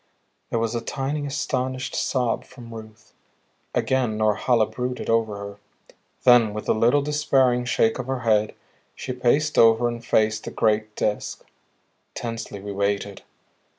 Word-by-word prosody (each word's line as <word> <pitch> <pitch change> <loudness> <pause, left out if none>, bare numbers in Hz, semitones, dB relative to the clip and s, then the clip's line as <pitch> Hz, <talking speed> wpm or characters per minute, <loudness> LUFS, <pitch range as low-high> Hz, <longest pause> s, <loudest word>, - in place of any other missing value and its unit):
There - - -1
was 115 0 -1
a 120 - -2
tiny, 145 +4 -3
astonished 130 -2 -2
sob 125 -4 0
from 120 -3 -12
Ruth. 110 -1 -12 0.6
Again 125 -5 +1
Norhala 110 +2 +2
brooded 125 0 -4
over 110 -2 +1
her. 100 0 -8 0.7
Then 120 -4 +5
with 105 - -5
a - - +4
little 120 +6 +3
despairing 135 -4 +2
shake 115 -1 +1
of 130 - -4
her 130 -1 -2
head, 110 -2 +2 0.4
she 130 - -5
paced 140 +5 +1
over 115 +1 +5
and 120 0 -5
faced 110 -2 +1
the - - -4
great 110 -1 0
Disk. 105 - -2 0.7
Tensely 115 -3 -5
we 100 +1 -6
waited. 100 0 -2
115 Hz, 145 wpm, -24 LUFS, 110-130 Hz, 0.7 s, Then